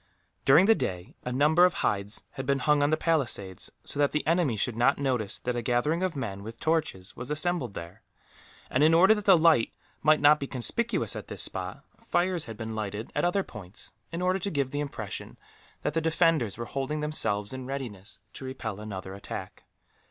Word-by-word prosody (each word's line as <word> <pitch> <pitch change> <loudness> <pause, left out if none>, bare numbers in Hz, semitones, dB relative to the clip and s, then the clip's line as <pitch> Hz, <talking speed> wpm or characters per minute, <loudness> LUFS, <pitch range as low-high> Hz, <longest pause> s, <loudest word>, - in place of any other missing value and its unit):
During 155 +8 +7
the 225 - +7
day, 90 - -4
a 125 - -3
number 150 +7 +4
of 180 0 +5
hides 100 +1 -1
had 135 -1 -6
been 140 0 +3
hung 150 +2 +3
on 145 - +3
the 155 - +2
palisades, 125 - -1
so - - -3
that 145 -1 +3
the 150 - 0
enemy 165 -8 +2
should 110 +3 -1
not 125 +4 +3
notice 125 -7 -1
that 125 0 -3
a 120 - -1
gathering 125 +8 +1
of 185 -3 -1
men, 100 -8 -4
with 110 +3 -9
torches, 155 - -1
was 120 +2 -6
assembled 155 - 0
there; 85 +4 -8 0.7
and 130 - +2
in 160 +1 +6
order 190 +5 +7
that 210 -2 -4
the 190 -3 +7
light 160 -7 +4 0.3
might 155 0 +5
not 150 +1 +6
be 140 - -4
conspicuous 225 - 0
at - - -6
this - - -1
spot, - - -3 0.2
fires 175 -2 0
had 115 -2 -8
been 110 -1 -5
lighted 105 0 -4
at 145 - +1
other 190 +3 +2
points, 100 - -10 0.2
in 170 +2 -3
order 185 +1 +2
to 200 - -2
give 140 -6 -1
the 145 - -2
impression 115 -9 -5 0.5
that - - -1
the 165 - +1
defenders 160 - +2
were 120 - -4
holding 135 +4 -3
themselves 105 -8 0
in 130 -1 -6
readiness 120 -8 -6 0.2
to - - -9
repel 125 -6 -5
another 95 -3 -6
attack. 100 - -8
135 Hz, 205 wpm, -28 LUFS, 110-160 Hz, 0.7 s, During